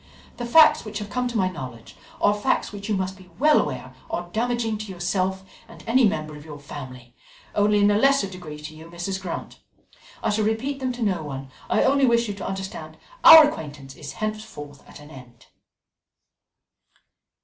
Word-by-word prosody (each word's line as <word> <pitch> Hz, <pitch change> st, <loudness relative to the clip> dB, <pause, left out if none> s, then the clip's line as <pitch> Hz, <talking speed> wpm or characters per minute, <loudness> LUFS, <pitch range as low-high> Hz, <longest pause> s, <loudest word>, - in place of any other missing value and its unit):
The 240 Hz, -, -4 dB
facts 310 Hz, +5 st, +6 dB
which 215 Hz, -1 st, -6 dB
have 210 Hz, -1 st, -6 dB
come 250 Hz, +1 st, -1 dB
to 240 Hz, -2 st, -3 dB
my 190 Hz, -3 st, +2 dB
knowledge 130 Hz, -10 st, -8 dB, 0.2 s
are 205 Hz, -, +4 dB
facts 205 Hz, 0 st, 0 dB
which 205 Hz, +1 st, -8 dB
you 210 Hz, -, +1 dB
must 190 Hz, 0 st, -3 dB
be 185 Hz, -1 st, -16 dB
well 300 Hz, +3 st, +5 dB
aware 130 Hz, -3 st, -5 dB, 0.2 s
are 175 Hz, 0 st, -4 dB
damaging 230 Hz, -1 st, -1 dB
to 215 Hz, -2 st, -6 dB
yourself 185 Hz, +1 st, -1 dB, 0.2 s
and 225 Hz, -, -14 dB
any 235 Hz, +1 st, +4 dB
member 155 Hz, -5 st, -3 dB
of 150 Hz, -, -11 dB
your 150 Hz, -2 st, -9 dB
family 130 Hz, -4 st, -10 dB, 0.4 s
only 210 Hz, 0 st, +3 dB
in 205 Hz, 0 st, +4 dB
a 205 Hz, -, +2 dB
lesser 275 Hz, -1 st, +4 dB
degree 180 Hz, -5 st, -9 dB
to 150 Hz, +1 st, -9 dB
you, 160 Hz, +1 st, -12 dB
Mrs. 175 Hz, +3 st, -4 dB
Grant. 180 Hz, -3 st, -6 dB, 0.6 s
I -, -, +1 dB
shall 215 Hz, +1 st, 0 dB
repeat 250 Hz, +6 st, -1 dB
them 260 Hz, -1 st, -1 dB
to 240 Hz, -1 st, -4 dB
no 190 Hz, -6 st, 0 dB
one. 135 Hz, -3 st, -7 dB, 0.2 s
I -, -, +3 dB
only 275 Hz, 0 st, +3 dB
wish 235 Hz, -1 st, +3 dB
you 205 Hz, -, -3 dB
to 200 Hz, -, -6 dB
understand 190 Hz, -5 st, -6 dB, 0.3 s
our 320 Hz, -2 st, +11 dB
acquaintance 145 Hz, -, -7 dB
is 145 Hz, -2 st, -8 dB
henceforth 215 Hz, -10 st, -6 dB
at -, -, -13 dB
an 150 Hz, +1 st, -14 dB
end." 125 Hz, -3 st, -14 dB
190 Hz, 190 wpm, -24 LUFS, 150-220 Hz, 0.6 s, our